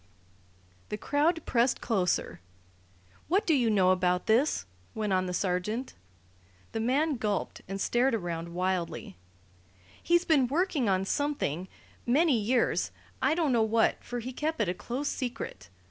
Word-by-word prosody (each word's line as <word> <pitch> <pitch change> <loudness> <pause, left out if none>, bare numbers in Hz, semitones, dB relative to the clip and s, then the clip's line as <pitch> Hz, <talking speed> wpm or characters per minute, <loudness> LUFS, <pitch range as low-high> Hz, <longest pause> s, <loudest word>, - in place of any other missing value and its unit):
The 210 - -3
crowd 305 +6 +1
pressed 240 +1 +2
closer. 180 - 0 0.9
"What 380 +6 +2
do 325 - +3
you 245 -5 +3
know 190 -3 +4
about 180 -1 +1
this?" 225 - +2 0.3
went 210 -3 -1
on 185 0 +1
the - - -3
sergeant. 195 +7 -2 0.8
The 225 - -3
man 275 +6 +1
gulped 210 -3 -2
and 195 +1 -4
stared 240 +4 +2
around 170 -3 -4
wildly. 180 - -2 0.9
"He's 345 +1 +3
been 285 -7 +4
working 295 - +1
on 190 0 +1
something 195 - -1 0.4
many 290 +4 +4
years 230 +3 +1 0.3
I - - +3
don't 325 -5 +1
know 235 - +3
what, 220 +1 +2
for 245 - -5
he 255 +3 -6
kept 315 +4 -2
it - - +2
a - - 0
close 250 +9 -4
secret. 235 - -4
230 Hz, 145 wpm, -29 LUFS, 185-280 Hz, 0.9 s, know